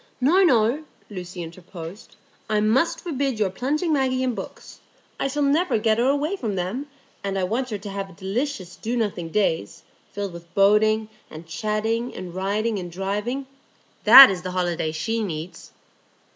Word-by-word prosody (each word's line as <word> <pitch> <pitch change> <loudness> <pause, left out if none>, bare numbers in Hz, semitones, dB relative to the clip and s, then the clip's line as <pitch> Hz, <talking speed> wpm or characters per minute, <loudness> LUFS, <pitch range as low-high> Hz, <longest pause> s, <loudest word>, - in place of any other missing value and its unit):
"No, 310 +9 +4
no," 245 -1 +3 0.3
Lucy 180 -2 -6
interposed. 170 +3 -10 0.3
"I 215 -1 +2
must 225 +10 +2
forbid 275 -7 -2
your 205 -3 0
plunging 300 - -1
Maggie 260 -2 +1
in 255 -1 0
books. - - -9 0.4
I - - 0
shall 290 +2 -1
never 300 +2 +2
get 220 0 +1
her 245 - +3
away 290 +6 0
from 225 - -3
them; 195 +11 -3 0.4
and 195 -1 -2
I 190 - 0
want 235 +7 -1
her 210 - -3
to 200 +1 -8
have 195 -2 -6
delicious 195 -1 -3
do 235 +2 -3
nothing 200 -7 -2
days, 165 - -1 0.3
filled 200 -3 -4
with 170 0 -12
boating 215 +2 +3 0.2
and 155 +2 -10
chatting 215 +8 -2
and 180 -2 -7
riding 205 +3 -1
and 175 -1 -7
driving; 205 +9 -3 0.6
that 255 +2 +11
is 185 -2 -4
the 185 - -5
holiday 175 -3 -1
she 225 +9 -2
needs." 170 -2 -6
215 Hz, 165 wpm, -23 LUFS, 185-255 Hz, 0.6 s, that